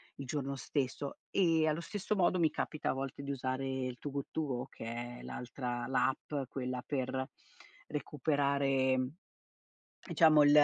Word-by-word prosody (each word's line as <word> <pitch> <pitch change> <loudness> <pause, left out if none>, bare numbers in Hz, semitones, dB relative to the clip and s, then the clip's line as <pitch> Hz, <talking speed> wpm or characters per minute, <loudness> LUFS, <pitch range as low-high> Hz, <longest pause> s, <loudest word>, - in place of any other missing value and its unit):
il 140 - -6
giorno 140 0 -2
stesso. 135 0 -2
E 165 -4 +4
allo 155 +2 +1
stesso 205 +3 -2
modo 185 -1 +3
mi 160 -2 +5
capita 155 - -1
a - - 0
volte 135 +1 -4
di 140 0 -3
usare 130 0 -1
il 130 -2 -2
Too 145 - -4
Good 140 -1 -1
To 160 - 0
Go 125 -3 -2
che - - -9
è 120 +1 -4
l'altra 125 -1 -3
la 130 - +3
app 140 -4 -4
quella 125 -1 -2
per 130 -1 -1 0.6
recuperare 140 -2 +2 1.1
diciamo 155 -2 +6
l 145 - +7
135 Hz, 160 wpm, -34 LUFS, 130-150 Hz, 1.1 s, l